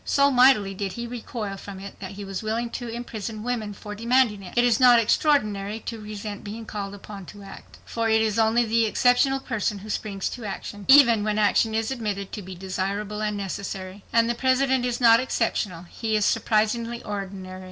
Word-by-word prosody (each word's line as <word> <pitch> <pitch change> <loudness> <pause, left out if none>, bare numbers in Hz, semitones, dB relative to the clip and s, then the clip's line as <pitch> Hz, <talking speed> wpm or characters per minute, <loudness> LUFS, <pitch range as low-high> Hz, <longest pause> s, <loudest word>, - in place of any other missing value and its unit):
So 280 0 +3
mightily 245 -6 +5
did 195 -1 -4
he 235 +3 -5
recoil 230 -4 -5
from 195 0 -9
it 200 0 -10
that 195 0 -7
he 200 +1 -7
was 195 -1 -5
willing 230 +2 -2
to 245 - -5
imprison 225 -2 -6
women 230 -4 -2
for 210 +1 -8
demanding 230 -1 +2
it. 190 +4 -11
It 240 - +5
is 240 -3 +3
not 250 -2 +7
extraordinary 215 -4 +1
to 230 -2 -6
resent 210 -1 -7
being 220 +2 -7
called 200 -2 -5
upon 200 -2 -10
to 205 -1 -11
act, 195 - -12
for 230 -1 -1
it 220 0 +4
is 220 0 +1
only 225 +2 +3
the 225 0 +2
exceptional 250 +4 +3
person 225 -5 -2
who 210 +2 -7
springs 200 -2 -3
to 245 - -8
action, 205 0 -6
even 255 -6 +7
when 215 0 -1
action 215 +1 +2
is 225 +2 -1
admitted 205 -6 -3
to 210 - -5
be 185 -1 -9
desirable 195 +3 -3
and 210 -1 -1
necessary. 195 0 -5
And 230 0 +4
the 235 - +1
President 260 0 +2
is 240 - -2
not 230 -2 +7
exceptional. 215 -8 -1
He 220 +5 -3
is 210 -1 +2
surprisingly 230 +2 0
ordinary. 195 -2 -6
215 Hz, 200 wpm, -25 LUFS, 200-235 Hz, -, not